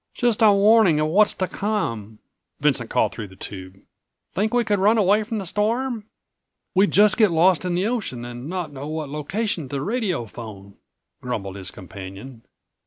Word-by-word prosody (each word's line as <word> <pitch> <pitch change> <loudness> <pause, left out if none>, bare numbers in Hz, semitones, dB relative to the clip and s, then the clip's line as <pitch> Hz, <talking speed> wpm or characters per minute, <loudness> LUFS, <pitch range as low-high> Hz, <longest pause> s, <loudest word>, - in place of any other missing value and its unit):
"Just 240 -2 +1
a 215 -2 +7
warning 200 -5 +5
of 155 - +2
what's 205 +5 +4
to 185 - -1
come," 115 - -3 0.4
Vincent - - +1
called - - +2
through 105 - -6
the 95 - -15
tube. 95 -1 -8 0.6
"Think 210 +4 0
we 245 -1 +2
could 210 -2 0
run 210 +4 +4
away 205 +1 +4
from 220 +1 -4
the 195 - -4
storm?" 225 +4 -1 0.7
"We'd 195 +2 +4
just 210 +1 +4
get 215 -4 +5
lost 175 +2 +3
on 175 - -1
the 180 +3 0
ocean 210 - -3
and 120 +4 -7
not 175 -5 -4
know 140 +1 -6
what 155 -2 -4
location 155 - -3
to 140 - -5
radiophone," 120 - -4 0.5
grumbled 100 -6 -4
his 95 -2 -7
companion. 100 +6 -10
180 Hz, 175 wpm, -23 LUFS, -, 0.7 s, a